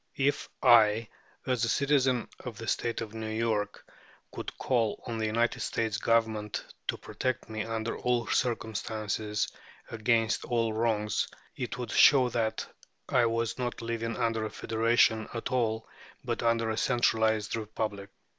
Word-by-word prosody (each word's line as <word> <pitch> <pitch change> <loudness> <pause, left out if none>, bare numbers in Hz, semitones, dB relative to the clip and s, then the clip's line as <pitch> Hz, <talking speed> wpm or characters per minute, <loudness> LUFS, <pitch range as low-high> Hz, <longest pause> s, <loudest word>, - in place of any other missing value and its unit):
If 140 +1 +1
I, 110 -2 +6 0.4
as 125 -2 0
a 115 - +2
citizen 135 -3 +2 0.2
of 120 -5 -6
the 115 - -7
State 120 -1 -1
of 110 -2 -6
New 110 -1 -4
York, 110 -2 -1 0.5
could - - -7
call 115 -5 +1
on 115 -2 -3
the 110 - 0
United 115 +2 +1
States 110 -2 -1
Government 110 -2 0 0.2
to - - -1
protect 130 -3 -3
me 110 -1 -3
under 115 0 -2
all 125 -1 0
circumstances 110 -2 -1 0.4
and 115 - -6
against 115 0 +2
all 115 -2 0
wrongs, 110 -2 0 0.3
it 125 -1 -4
would 125 -3 -5
show 130 -4 +6
that 115 -2 -1 0.4
I 125 -3 +4
was 115 +1 -1
not 120 -2 -3
living 115 -1 -2
under 115 -1 0
a 110 - -2
federation 110 0 +2
at 115 - -3
all, 110 -3 0 0.4
but - - -2
under 115 -1 +2
a 110 - -3
centralized 110 -4 +2
republic. 105 -2 -4
115 Hz, 150 wpm, -29 LUFS, 110-120 Hz, 0.5 s, I